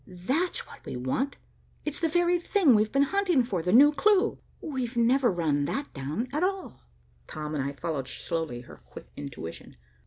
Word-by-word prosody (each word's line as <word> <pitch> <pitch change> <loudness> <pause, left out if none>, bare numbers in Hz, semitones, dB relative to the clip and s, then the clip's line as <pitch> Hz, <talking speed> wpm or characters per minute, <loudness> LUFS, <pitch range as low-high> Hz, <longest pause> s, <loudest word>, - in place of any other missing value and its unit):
"That's 260 - -2
what - - -14
we - - -6
want. 130 - -1 0.5
It's 300 -1 -3
the 330 - +2
very 350 +1 +2
thing 345 - +4
we've 215 0 +3
been 275 0 +4
hunting 370 -9 +3
for, 195 -8 -2
the 180 +2 -1
new 280 +7 +8
clue. 415 +7 +2 0.2
We've 255 -5 -4
never 245 +1 +4
run 155 -5 0
that 280 - -3
down, 150 - -3
at 300 - 0
all." 380 0 -2 0.5
Tom 155 0 -5
and 145 -3 -1
I 140 +1 -3
followed 140 -2 -3
slowly 160 -5 -4
her 120 - -13
quick - - -13
intuition. 140 - -8
240 Hz, 180 wpm, -28 LUFS, -, 0.5 s, new